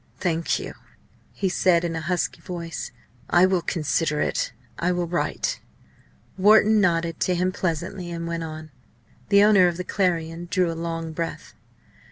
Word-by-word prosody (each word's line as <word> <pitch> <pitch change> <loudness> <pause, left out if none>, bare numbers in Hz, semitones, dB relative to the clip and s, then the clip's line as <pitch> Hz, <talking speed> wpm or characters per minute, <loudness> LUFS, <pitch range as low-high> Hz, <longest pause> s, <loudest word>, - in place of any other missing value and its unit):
"Thank 170 -2 0
you," - - -6 0.6
he 195 - -2
said, 180 -2 +3
in 170 -1 -2
a 160 - -3
husky 175 +3 -2
voice. 170 -5 -6 0.4
"I 175 +1 +6
will 185 -2 +2
consider, 155 -2 0 0.5
I 175 +1 +1
will 175 -1 0
write." 175 - -2 0.8
Wharton 215 +2 +6
nodded 165 -3 +1
to 180 - +1
him 180 +1 +1
pleasantly, 175 +1 -3
and 170 -1 -5
he 170 0 -3
went. 155 -1 -7 0.6
The 200 0 +6
owner 205 -4 +6
of 175 -1 -2
the 180 - -3
Clarion 170 -3 -1
drew 180 -3 +1
a - - -3
long 165 -1 -4
breath. 165 +1 -5
175 Hz, 155 wpm, -24 LUFS, 165-185 Hz, 0.8 s, I